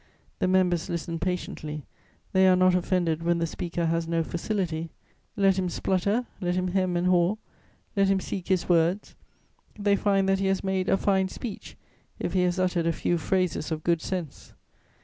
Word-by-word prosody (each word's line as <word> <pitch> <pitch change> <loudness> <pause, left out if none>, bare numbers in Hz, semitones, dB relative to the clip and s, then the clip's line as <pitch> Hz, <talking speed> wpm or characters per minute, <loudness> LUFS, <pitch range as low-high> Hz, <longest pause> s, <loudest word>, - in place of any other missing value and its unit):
The - - +1
members 180 -2 +2
listen 170 0 -3
patiently; 155 -4 -4 0.5
they 190 0 +5
are 185 - +6
not 185 0 +4
offended 175 -3 +1
when 170 0 +1
the 170 - 0
speaker 170 +1 -3
has 165 0 0
no 165 0 +1
facility; 170 -2 -2 0.5
let 195 -1 +3
him 185 -1 -1
splutter, 200 +7 0 0.2
let 180 -1 0
him 185 0 0
hem 185 -1 0
and 175 - 0
haw, 180 +2 +3 0.6
let 195 -1 +3
him 195 0 +3
seek 185 -1 -5
his 185 -3 +1
words, 175 +3 +2 0.6
they 205 -1 +2
find 195 -1 +2
that 195 0 +2
he 195 - 0
has 195 0 0
made 190 -1 0
"a 195 - +4
fine 190 -2 +2
speech" 220 +1 -7 0.4
if - - -3
he 185 - +3
has 180 0 +1
uttered 180 -2 +1
a - - +3
few 170 +1 0
phrases 180 -2 -1
of 155 -1 -3
good 170 -2 +1
sense. 175 -6 -5
180 Hz, 185 wpm, -27 LUFS, 170-190 Hz, 0.6 s, are